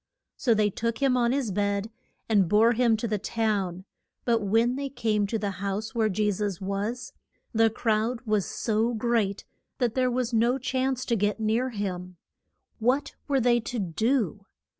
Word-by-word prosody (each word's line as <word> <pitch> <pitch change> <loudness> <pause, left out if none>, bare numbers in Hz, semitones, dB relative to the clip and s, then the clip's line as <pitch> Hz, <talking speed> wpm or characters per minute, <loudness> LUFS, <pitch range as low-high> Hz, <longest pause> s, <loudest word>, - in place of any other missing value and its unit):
So 235 -3 +2
they 210 -1 +2
took 230 +3 -2
him 270 -2 +2
on 240 -1 +2
his 265 -5 0
bed 200 +2 -1 0.4
and 200 -6 +3
bore 225 +4 +5
him 235 -1 +3
to 235 - -2
the 210 -1 -1
town; 195 -4 -1 0.4
but 235 -2 +3
when 225 +5 +2
they 280 0 -3
came 215 -6 0
to 225 - -1
the 205 -1 -2
house 200 +3 -3
where 225 -3 +2
Je 210 +1 +1
sus 200 -2 -2
was, 200 +6 -3 0.4
the 225 0 +4
crowd 225 +2 0
was 215 -5 0
so 225 +2 0
great 220 -3 0 0.3
that 240 -3 0
there 255 -1 +2
was 250 -1 -1
no 235 +3 +3
chance 260 0 -1
to 235 - +1
get 210 +1 0
near 225 +4 +1
him. 185 -5 -5 0.6
What 255 +6 +1
were 275 -2 +2
they 240 -1 +3
to 240 +2 -5
do? 205 - 0
225 Hz, 175 wpm, -27 LUFS, 205-240 Hz, 0.6 s, bore